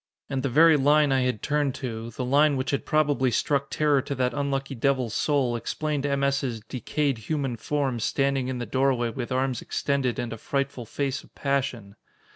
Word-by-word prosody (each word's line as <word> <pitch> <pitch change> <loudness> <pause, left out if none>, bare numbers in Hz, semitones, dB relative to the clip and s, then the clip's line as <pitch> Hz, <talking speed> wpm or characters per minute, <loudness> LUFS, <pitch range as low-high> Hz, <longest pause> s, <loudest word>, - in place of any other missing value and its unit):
And 135 -1 -1
the 135 - -1
very 155 +4 +6
line 145 +1 +4
I 135 -1 +3
had 125 -4 -1
turned 145 -3 0
to, 115 -2 -5
the 125 +2 -4
line 145 +2 +4
which 130 0 -2
had 140 - -2
probably 145 -4 +2
struck 140 +3 0
terror 150 -3 +2
to 140 0 -4
that 125 -1 0
unlucky 140 -1 -2
devil's 130 -2 0
soul, 135 -3 +1
explained 145 +4 -2
M. 140 0 0
S.'s 135 -4 0
"decayed 130 +3 -2
human 135 +1 -2
form, 135 0 -1
standing 135 +2 0
in 130 -1 -3
the 120 - -3
doorway 130 0 +1
with 125 +1 -5
arms 130 -1 0
extended 135 -4 -1
and 115 -2 -3
a 115 - -8
frightful 135 -3 -3
face 135 +2 -2
of - - -22
passion!" 135 -7 -2
135 Hz, 190 wpm, -26 LUFS, 125-140 Hz, -, very